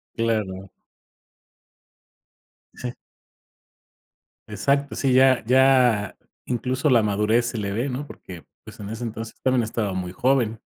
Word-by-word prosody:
Claro. 105 -5 -2 2.0
Sí. 125 -1 -6 1.6
Exacto. 140 +7 0
Sí, 135 -2 0
ya 130 -2 +5
ya 125 -5 +3 0.3
incluso 130 +4 -1
la 120 -4 +4
madurez 105 +3 +1
se 120 - -4
le 100 -1 -3
ve, 120 +6 -1
¿no? 140 +3 -5
Porque, 85 -5 -11 0.2
pues, - - -13
en 100 0 -7
ese 115 +2 -6
entonces 115 0 -6
también 130 -2 +2
estaba 110 -3 -2
muy 90 -1 -4
joven. 120 -2 +1
115 Hz, 125 wpm, -23 LUFS, 105-130 Hz, 2.0 s, ya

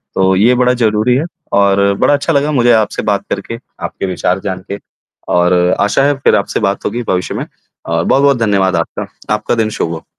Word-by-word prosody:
तो 95 0 +2
ये 115 +6 +4
बड़ा 125 0 +2
ज़रूरी 115 0 +1
है 140 - +1 0.4
और 100 0 +3
बड़ा - - +3
अच्छा 145 +3 0
लगा 145 +1 +1
मुझे 120 -4 +3
आपसे 110 -2 0
बात 100 -2 -1
करके, 100 +4 -4 0.3
आपके - - -4
विचार 90 0 -1
जान 95 -2 -5
के 100 - -4 0.5
और 90 +1 +3 0.3
आशा 105 +7 +2
है, 145 - +3
फिर 135 - +3
आपसे 100 -1 -1
बात 100 -2 -1
होगी 120 +3 -2
भविष्य 90 -1 -1
में - - -3
अ, 85 0 -6
बहुत-बहुत 140 -1 +3
धन्यवाद 100 -4 +1
आपका। 85 -1 -3 0.3
आपका - - -2
दिन 110 -2 0
शुभ 85 - -1
हो। 80 - -8
105 Hz, 200 wpm, -14 LUFS, 95-125 Hz, 0.5 s, ये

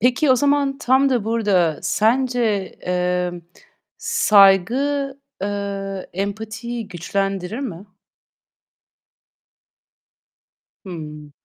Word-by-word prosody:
Peki, 255 +5 +3
o 255 - +6
zaman 280 0 +1
tam 265 -1 +3
da 245 -5 +1
burada 200 -8 +1
sence, 230 -3 +1
eee, 180 0 0 0.7
saygı, 275 - +3 0.2
eee, 200 -1 -4
empatiyi 220 +4 -5
güçlendirir 195 +3 -3
mi? 205 -9 -6 3.0
Hıı. 150 -5 -8
210 Hz, 75 wpm, -21 LUFS, 190-255 Hz, 3.0 s, o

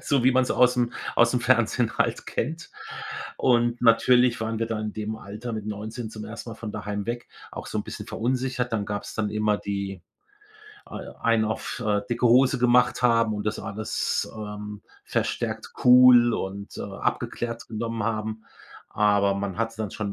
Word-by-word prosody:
So 135 -4 +1
wie 130 - +5
man's 130 0 +2
aus'm 125 -1 +3 0.2
aus'm - - +4
Fernsehen - - +2
halt - - 0
kennt. 160 +7 -3 0.7
Und 120 -1 +2
natürlich 125 +1 +5
waren 110 0 -2
wir 115 - 0
da 115 -1 -3
in 110 -1 -3
dem 110 0 -4
Alter 110 +3 -7
mit 110 -2 -5
19 110 +2 -5
zum 110 -1 -8
1. 115 +1 -8
Mal - - -7
von 110 -2 -6
daheim 105 0 -4
weg, 120 +1 -4 0.2
auch - - -7
so 110 - -3
'n - - -3
bisschen 105 - -7
verunsichert. 125 +2 -1
Dann 105 -3 -1
gab's 105 0 -5
dann 105 -2 -1
immer 105 0 +1
die 100 -2 -4 0.9
al - - -8
einen 115 -1 +3
auf, 110 +3 -3
äh, 105 -1 +2
dicke 120 +1 +1
Hose 125 +3 +5
gemacht 125 0 +3
haben 115 -2 +3
und 105 0 -4
das 105 - -1
alles, 110 +2 -2
ähm, 105 -1 -7 0.2
verstärkt - - -2
cool 125 -1 +8
und, 100 +1 -5
äh, - - -3
abgeklärt 115 -1 -3
genommen 115 0 -3
haben. 110 0 -3 0.4
Aber 100 -1 +2
man 100 0 -4
hatte 115 0 -2
dann 110 -2 -3
schon 110 +1 -4
110 Hz, 175 wpm, -25 LUFS, 105-120 Hz, 0.9 s, cool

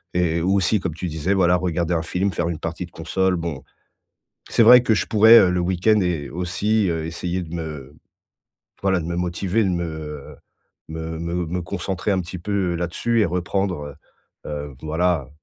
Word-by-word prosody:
Et 85 -2 +1
ou 95 +4 +2
aussi, 100 +2 +2
comme 85 -4 -3
tu 90 - -5
disais, 80 +4 -1
voilà 90 -1 +4
regarder 90 -1 -1
un 80 - 0
film, 95 +4 -1
faire 85 +1 -1
une 80 - -3
partie 85 +2 -4
de - - -24
console. 95 +3 0
Bon, 80 -5 -5 0.9
c'est - - +2
vrai 125 +2 +8
que 110 - +3
je - - -1
pourrais, 110 +1 +8
heu, 90 - +4
le 90 - 0
week-end 95 +4 +2
et 85 -6 -2
aussi, 95 +5 0
heu, 80 -1 -2
essayer 90 +2 -3
de 80 - -10
me 75 -3 -7 0.9
voilà, 95 -2 +2
de 80 - -5
me 85 - -3
motiver, 90 +4 0
de 95 - +1
me, 85 -1 -1
heu, 75 -3 -7 0.5
me 80 0 -5
me 85 +1 -2
me 90 +2 -3
concentrer 95 +4 -3
un 95 - +1
petit 90 +2 -7
peu, 95 +5 -6 0.2
heu, - - -2
là-dessus 90 +7 0
et - - +4
reprendre, 85 -4 -2 0.5
heu - - -6 0.2
heu, - - -15
voilà, 80 -3 0
90 Hz, 200 wpm, -22 LUFS, 80-95 Hz, 0.9 s, vrai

